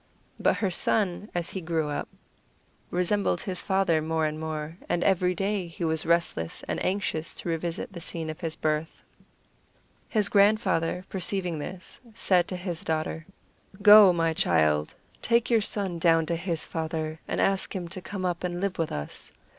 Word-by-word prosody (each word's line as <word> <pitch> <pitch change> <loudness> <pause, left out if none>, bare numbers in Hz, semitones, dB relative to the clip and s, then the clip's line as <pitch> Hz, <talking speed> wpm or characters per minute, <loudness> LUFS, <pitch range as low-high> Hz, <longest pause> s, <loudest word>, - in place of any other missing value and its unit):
But - - +2
her 195 -4 0
son, 200 +2 +1
as 175 -1 +1
he 190 - -4
grew 160 -2 -1
up, 145 - -3 0.8
resembled 180 +1 +1
his 185 -2 -3
father 190 -5 +2
more 160 0 0
and 155 0 -2
more, 155 0 -4
and 175 - +1
every 180 -1 +2
day 195 0 -1
he 170 +1 -7
was 160 -1 0
restless 170 - 0
and - - -2
anxious 185 -4 -1
to - - -5
revisit 165 +3 -3
the 170 - -7
scene 165 -1 -4
of 155 0 -6
his 165 -3 -3
birth. 155 +1 -2 1.1
His 210 -3 +2
grandfather, 190 -4 +2
perceiving 180 -3 -2
this, 180 +5 -8 0.2
said 180 -5 +3
to 185 - -4
his 175 -2 -4
daughter: 160 +1 -2 0.6
"Go, 210 -2 +10
my 165 -2 +1
child, 75 - +2 0.3
take 235 +1 +2
your 230 -2 +4
son 195 -4 -1
down 165 -1 +4
to 170 - -1
his 165 -1 -1
father, 160 -1 -3
and - - -2
ask 195 +1 +1
him 180 -2 -3
to 185 +1 -6
come 190 0 -5
up 175 -1 -2
and 175 -1 -2
live 195 -1 -2
with 165 - -1
us. 75 0 -4
175 Hz, 170 wpm, -27 LUFS, 160-190 Hz, 1.1 s, Go